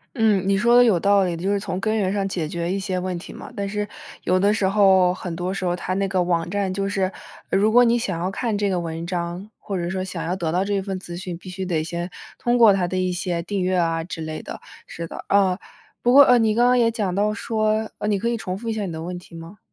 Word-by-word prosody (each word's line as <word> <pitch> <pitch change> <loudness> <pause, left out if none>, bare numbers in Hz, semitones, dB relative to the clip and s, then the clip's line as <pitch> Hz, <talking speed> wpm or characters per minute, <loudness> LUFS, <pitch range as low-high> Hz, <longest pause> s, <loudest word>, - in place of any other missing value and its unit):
嗯， 210 -5 +2
你 195 - +3
说 235 +4 +4
得 245 - +8
有 205 -8 +3
道 200 0 +4
理 175 -2 -1
的， 165 - -7
就 200 - +1
是 200 - +1
从 190 -2 -4
根 215 +2 0
源 195 -3 +1
上 200 -1 -1
解 170 -5 -3
决 170 +2 -3
一 195 - -1
些 190 -2 -2
问 180 -1 -2
题 - - -10
嘛。 - - -10
但 200 -1 -3
是 210 0 -2 0.4
有 185 +1 +2
的 200 +2 +3
时 205 -3 +1
候 190 -3 +4
很 180 -2 -6
多 180 +2 -3
时 195 - -4
候 175 -1 +1
它 185 +1 -3
那 195 0 0
个 185 -1 +1
网 170 -1 0
站 195 -1 -1
就 195 0 -1
是， 190 -1 0 0.4
如 210 +3 +3
果 245 +2 +7
你 235 0 +3
想 185 -7 -2
要 185 +2 -2
看 220 -1 -2
这 205 -1 0
个 180 - 0
文 165 0 -4
章， 175 +3 -4
或 195 -2 -4
者 175 0 -2
说 185 +1 -2
想 175 -3 -5
要 180 +2 -1
得 165 -4 -2
到 185 +3 +1
这 200 -1 0
份 190 -1 -4
资 175 -2 -8
讯， 180 -1 -6
必 185 - -15
须 190 +1 -5
得 165 -4 -1
先 170 +2 -4 0.3
通 240 0 +1
过 225 -4 +7
它 180 -2 0
的 185 - -3
一 185 0 0
些 175 -2 -2
订 200 0 -2
阅 185 0 +1
啊 165 -1 +1
之 165 -1 -7
类 155 0 -5
的。 - - -8 0.3
是 170 - -6
的， - - -8
嗯， 195 -2 +3 0.4
不 245 - +3
过 285 +2 +9
呃， 250 -2 +5
你 220 -1 +2
刚 240 +1 +4
刚 250 0 +4
也 230 -1 +4
讲 205 -5 -2
到 205 +2 +1
说， 215 0 -1
呃， 210 - -2
你 205 -2 +2
可 230 +4 -1
以 235 - 0
重 190 -4 -4
复 230 +2 -8
一 225 - 0
下 210 -2 -2
你 - - -5
的 160 0 -6
问 180 +1 -5
题 170 - -15
吗？ 165 +5 -10
190 Hz, 305 characters per minute, -23 LUFS, 175-210 Hz, 0.4 s, 过